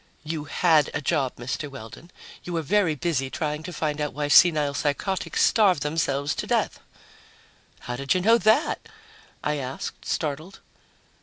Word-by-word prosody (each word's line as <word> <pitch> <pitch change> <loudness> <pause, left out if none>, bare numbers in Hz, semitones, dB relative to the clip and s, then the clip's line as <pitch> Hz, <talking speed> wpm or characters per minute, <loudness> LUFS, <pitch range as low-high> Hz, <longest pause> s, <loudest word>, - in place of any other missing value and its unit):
"You 155 -1 -4
had 155 0 +3
a - - 0
job, 140 -3 0
Mr. 130 +5 -4
Weldon. 130 +5 -11 0.3
You 175 - -6
were 165 -1 -1
very 180 -1 +2
busy 135 -2 -1
trying 150 +1 -3
to 180 - -7
find 155 -3 -2
out 150 - -2
why 145 0 -2
senile 150 -3 +5
psychotics 150 +7 -1
starve 195 -9 +3
themselves 145 -2 -1
to - - -3
death." - - 0 1.0
"How 125 0 -5
did 140 +6 0
you 185 - +1
know 225 +5 +5
that?" 230 - +2 0.5
I 150 0 0
asked, 130 -1 -6
startled. 155 +4 -3
150 Hz, 155 wpm, -25 LUFS, 140-175 Hz, 1.0 s, senile